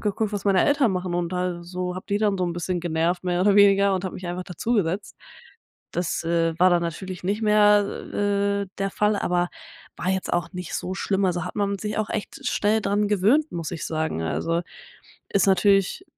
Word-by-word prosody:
geguckt, 210 0 -1
was 205 - -3
meine 195 -2 +4
Eltern 285 -7 +3
machen. 180 -1 -2
Und 175 0 -1
da 180 -1 -2
so 180 +1 -4
habe 185 - -7
die 205 0 +1
dann 205 -2 +1
so 180 - +1
'n 175 - -2
bisschen 175 +1 -2
genervt, 170 +2 -1
mehr 175 0 0
oder 200 +2 +4
weniger 200 -1 +5
und 185 0 -3
habe 185 - -4
mich 185 - -7
einfach 175 +1 -4
dazugesetzt. 195 0 -2 0.8
Das, 175 -1 -2
äh, 165 -1 +1
war 185 +1 +5
dann 175 -1 +3
natürlich 180 +2 -5
nicht 205 +4 -1
mehr, 210 -1 +5 0.8
äh, - - -14
der 195 0 -1
Fall, 210 +1 +1
aber 175 -2 0 0.5
war 180 - -3
jetzt 190 0 -2
auch 175 0 -1
nicht 180 -2 -6
so 185 - -3
schlimm, 195 0 0
also, 175 -2 0
hat - - -7
man 200 -1 0
sich 210 +2 -3
auch 215 -1 -2
echt 215 - -5
schnell 215 +2 +1
dran 205 +1 0
gewöhnt, 215 +10 +3
muss 165 -2 -4
ich 165 - -4
sagen. 155 - -2
Also, 165 - -1 0.7
ist 200 - +3
natürlich 195 - +3
185 Hz, 205 wpm, -24 LUFS, 175-205 Hz, 0.8 s, weniger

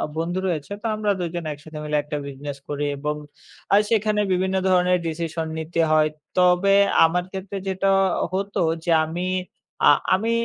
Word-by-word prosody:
বন্ধু 175 +3 -2
রয়েছে। 160 +1 -3
তো - - -11
আমরা 210 -1 0
২ 175 -2 -2
জন 170 -2 -4
একসাথে 150 +1 -11
মিলে 150 0 0
একটা 150 0 -4
business 140 0 -7
করি 145 0 -2
এবং 150 +1 -2 0.6
আর 205 - +7
সেখানে 215 -1 +1
বিভিন্ন 190 +1 +1
ধরনের 180 0 +3
decision 165 0 -3
নিতে 165 +1 -4
হয়। 155 0 +4 0.3
তবে 180 +2 +4 0.3
আমার 175 +2 +1
ক্ষেত্রে 195 +1 -6
যেটা 190 +1 0 0.4
হতো 200 +1 -2 0.2
যে - - -4 0.2
আমি 170 +3 -4 0.6
আ - - +9 0.3
আমি 225 +4 -1
175 Hz, 160 wpm, -23 LUFS, 155-190 Hz, 0.6 s, আ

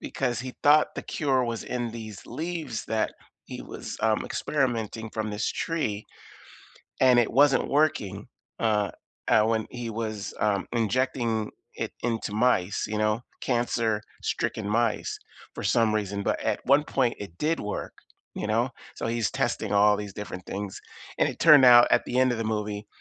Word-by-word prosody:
because 125 -3 -2
he 130 0 -6
thought 150 +1 +6
the - - -5
cure 135 -4 0
was 115 -1 -4
in 120 -2 -3
these 110 -3 -8
leaves 160 -8 -4
that 110 -1 -1 0.3
he - - -8
was, - - -7
um, - - +2
experimenting 115 -6 -2
from 110 0 -3
this 105 +1 -1
tree 110 -11 -2 1.0
and 125 -2 +6
it 120 - +3
wasn't 140 +2 +4
working, 135 -10 0 0.3
uh, 105 -3 +1 0.4
uh, 110 - +5
when 110 -1 0
he 120 -2 -5
was, 110 -2 -4
um, 100 -2 +1
injecting 115 -1 0 0.3
it - - -4
into 115 -3 -2
mice, 105 -4 +1
you 110 - -3
know, 110 +1 +1 0.2
cancer-stricken 115 -3 -1
mice 115 +1 0 0.4
for - - -6
some 110 -2 +2
reason. 100 -1 -2
But - - -1
at - - -2
one 140 +3 +5
point 130 -5 0
it 100 -5 -8
did 160 +2 0
work, 105 - -4 0.4
you - - -3
know? 115 +4 +1 0.3
So, - - -3
he's 115 -1 0
testing - - -1
all 105 +1 +5
these 100 -2 -6
different 95 -3 -7
things, 100 -1 -5 0.4
and - - +3
it - - -6
turned 150 -5 +8
out 120 -1 +9
at - - +4
the 125 - -1
end 130 -1 +4
of 115 - -3
the 115 - -2
movie 105 -1 -3
115 Hz, 165 wpm, -26 LUFS, 105-125 Hz, 1.0 s, out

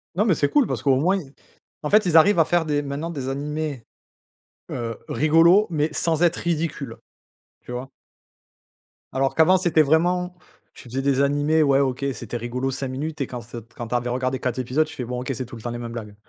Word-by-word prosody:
Non 210 - +2
mais 185 -8 +3
c'est 145 - +1
cool 285 -8 +3
parce - - -3
qu'au 135 -2 +4
moins, 180 +9 +2
ils 140 -7 -9 0.5
en 150 - -3
fait, 210 -2 +5
ils 165 -2 +3
arrivent 175 +3 +6
à - - +6
faire 175 0 +1
des 145 -1 0
maintenant 145 +4 -4
des 135 -5 -5
animés, 145 -2 -3 0.9
heu, 115 -2 -4
rigolos 165 +7 +5
mais 155 -1 0
sans 165 +1 +1
être 170 -1 +3
ridicule, 170 -2 -3 0.6
tu - - -11
vois? 125 +2 -5 1.2
Alors 135 0 0
qu'avant 160 +4 +5
c'était 170 -4 +3
vraiment 180 +4 +1 0.4
tu - - -13
faisais 130 +3 -2
des 140 0 +2
animés, 145 +3 +2
ouais 140 -1 +3
OK, 135 0 0
c'était 120 - -6
rigolo 125 +3 -3
5 135 0 -4
minutes 150 +3 -4
et 135 - -1
quand 125 - -6
cet 115 0 -11
quand 120 - -6
tu 125 - -2
avais 120 0 -1
regardé 130 +1 -1
4 125 0 -2
épisodes, 130 +5 +1
tu - - -11
fais: 125 - -4
«Bon 125 +1 -4
OK, 130 +2 -4
c'est 130 +1 -4
tout 120 - -10
le 115 - -10
temps 120 - -4
les 120 - -4
mêmes 115 -1 -6
blagues». 105 -3 -7
140 Hz, 220 wpm, -23 LUFS, 125-160 Hz, 1.2 s, arrivent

